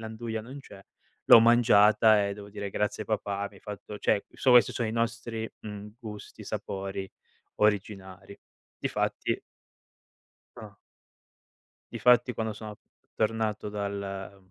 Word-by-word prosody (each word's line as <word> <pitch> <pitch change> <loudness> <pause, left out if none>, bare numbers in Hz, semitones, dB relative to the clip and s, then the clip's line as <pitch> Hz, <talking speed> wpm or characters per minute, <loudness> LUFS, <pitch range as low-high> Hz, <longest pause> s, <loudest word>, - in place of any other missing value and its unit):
l'anduia 110 0 -5
non 130 +6 -10
c'è, 100 -7 -14 0.5
l'ho 115 - +10
mangiata 110 -2 +5
e 100 - -2
devo 100 0 -10
dire: 100 -1 -6
“Grazie, 105 +1 -2
papà, 100 -2 -2
mi 100 - -20
hai - - -17
fatto 105 0 -8
"cioè, 100 -2 +2 0.3
questi 125 -1 +6
sono 115 -3 -2
i - - -3
nostri, 115 -1 -2
mhmm, 105 0 -8
gusti, 105 -3 -9
sapori 95 0 -5 0.5
originari. 100 -2 -1 0.4
Difatti - - -2 1.2
Ah. 105 -3 -11 1.1
Difatti 125 0 +3
quando 110 -1 -2
sono 105 -1 -9 0.4
tornato 110 -1 -1
dal 100 -1 -5
105 Hz, 120 wpm, -28 LUFS, 100-110 Hz, 1.2 s, l'ho